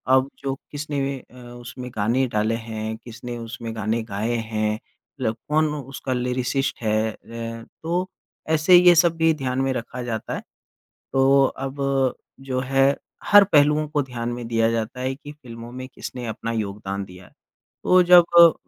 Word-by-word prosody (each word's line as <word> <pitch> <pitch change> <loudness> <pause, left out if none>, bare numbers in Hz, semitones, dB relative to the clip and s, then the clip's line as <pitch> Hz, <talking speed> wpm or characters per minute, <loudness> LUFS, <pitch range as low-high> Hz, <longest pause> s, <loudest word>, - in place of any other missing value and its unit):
अब 130 +1 +2
जो 135 -1 -2 0.2
किसने 140 -2 -3
अ, 125 - -21
उसमें 120 +1 -9
गाने 120 +5 +1
डाले 110 +2 +2
हैं, 110 0 -4
किसने 120 +1 -8
उसमें 115 0 -6
गाने 110 +1 -1
गाए 110 +3 -2
हैं, 110 -2 -1
मतलब 115 +1 -6
कौन 155 0 +2
उसका 135 -2 -5
लिरिसिस्ट 125 +1 -1
है 110 0 +1 0.2
है, 115 0 -6 0.2
तो 175 +3 -1 0.4
ऐसे 160 +3 +5
ये 175 0 +8
सब 170 0 +4
भी 160 0 +4
ध्यान 130 -1 -1
में 135 0 +1
रखा 125 +1 -5
जाता 115 -3 -4
है। - - -5 0.7
तो 135 +1 +5
अब 135 +1 -5 0.7
जो 130 0 0
है 135 +1 +2 0.4
हर 205 -1 +8
पहलुओं 150 -3 +3
को 150 -1 0
ध्यान 120 -3 -4
में 120 -1 -6
दिया 115 -1 +2
जाता 115 +2 -3
है 130 +1 -1
कि 145 +1 -11
फ़िल्मों 120 -5 -10
में 130 +1 -7
किसने 125 -1 -7
अपना 110 +1 -4
योगदान 100 -3 -3
दिया। 90 0 -14 0.6
तो 185 0 +6
जब 175 0 +8 0.2
अ, 170 -1 +9
125 Hz, 165 wpm, -23 LUFS, 115-140 Hz, 0.7 s, अ